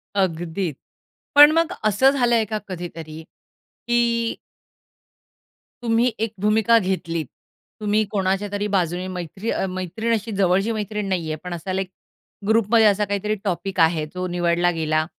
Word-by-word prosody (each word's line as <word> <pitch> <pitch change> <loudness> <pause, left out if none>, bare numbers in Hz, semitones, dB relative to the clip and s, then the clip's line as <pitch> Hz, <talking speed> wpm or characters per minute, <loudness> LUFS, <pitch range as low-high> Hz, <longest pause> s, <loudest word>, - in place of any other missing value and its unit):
अगदी. 175 -2 -1 0.6
पण 290 +1 +10
मग 330 +2 +2
असं 215 +6 +4
झालंय 240 -4 +2
का 215 0 -3
कधीतरी 165 -3 -7 0.7
की 235 -1 +1 1.5
तुम्ही 235 +1 +2
एक 225 - -5
भूमिका 220 +2 +4
घेतलीत, 170 -5 -2 0.5
तुम्ही 210 +1 +1
कोणाच्यातरी 200 +1 -1
बाजूने 180 0 0
मैत्री 180 +5 -4
अ - - -1
मैत्रीण 185 +5 -3
अशी 225 +1 -3
जवळची 195 +4 +2
मैत्रीण 210 -1 -3
नाहीये 165 -5 -2
पण 180 -1 -4
असा 175 +3 -5
लाइक 190 0 -2 0.6
ग्रुपमध्ये 225 0 +4
असा 205 0 +3
काहीतरी 205 +1 -1
टॉपिक 190 -1 -2
आहे 160 -1 +3
जो 180 0 -3
निवडला 175 0 +2
गेला 155 0 +1
195 Hz, 130 wpm, -22 LUFS, 175-220 Hz, 1.5 s, पण